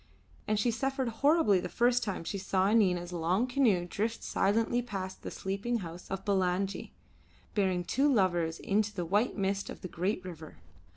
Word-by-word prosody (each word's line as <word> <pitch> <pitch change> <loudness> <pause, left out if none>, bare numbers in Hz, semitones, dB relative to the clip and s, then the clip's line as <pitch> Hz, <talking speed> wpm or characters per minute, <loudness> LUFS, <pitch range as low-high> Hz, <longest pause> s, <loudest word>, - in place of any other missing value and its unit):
And 215 -1 +1
she 235 +2 +2
suffered 265 +2 -1
horribly 285 - +5
the - - -4
first 245 +1 +2
time 195 -5 -3
she 200 +4 -4
saw 190 +1 +1
Nina's 180 -5 +2
long 175 +7 +1
canoe 245 -9 +2
drift 220 +5 -2
silently 230 +4 +1
past 195 -5 -5
the - - -5
sleeping 200 +5 -2
house 170 +2 -9
of 195 0 -4
Bulangi, 190 0 0 0.6
bearing 190 -4 +1
the - - -24
two 280 +2 +3
lovers 175 -7 +2
into 210 +1 +1
the 175 -2 -2
white 205 +9 +1
mist 195 0 -1
of - - -8
the - - -5
great 185 +2 -2
river. 160 -4 -9
195 Hz, 175 wpm, -31 LUFS, 180-230 Hz, 0.6 s, horribly